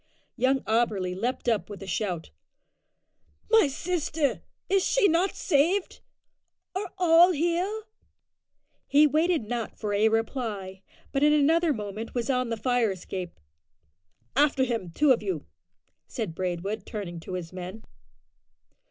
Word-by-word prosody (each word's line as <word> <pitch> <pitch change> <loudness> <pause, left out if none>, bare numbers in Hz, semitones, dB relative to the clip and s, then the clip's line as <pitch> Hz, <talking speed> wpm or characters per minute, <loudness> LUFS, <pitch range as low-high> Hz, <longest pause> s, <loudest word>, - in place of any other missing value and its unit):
Young 260 +2 +2
Auberly 215 -5 0
leaped 245 +6 -3
up 225 -4 +1
with 205 -1 -8
a - - -7
shout. 180 -3 -3 1.2
"My 445 -8 +6
sister! 310 0 -1 0.3
is 390 -1 +2
she - - +3
not 350 +3 +1
saved? 355 +5 +1 0.7
Are 385 0 -4
all 350 0 +6
here?" 350 +7 0 1.0
He 295 +2 +6
waited 315 0 +2
not 230 +1 -4
for 210 -2 -3
a 210 +2 +4
reply, 220 -5 -2 0.3
but 275 - 0
in 300 +1 +5
another 320 +3 +3
moment 215 -1 -5
was 240 +2 0
on 250 -2 0
the 230 - -2
fire 245 -1 +1
escape. 185 -1 -6 1.0
"After 280 -1 +3
him, 230 -8 -2
two 285 - +3
of 250 - +3
you," 380 - -3 0.6
said 220 - -4
Braidwood, 185 +4 -3
turning 180 -5 -5
to 165 - -8
his 180 -1 -5
men. 185 +4 -7
245 Hz, 135 wpm, -27 LUFS, 205-315 Hz, 1.2 s, My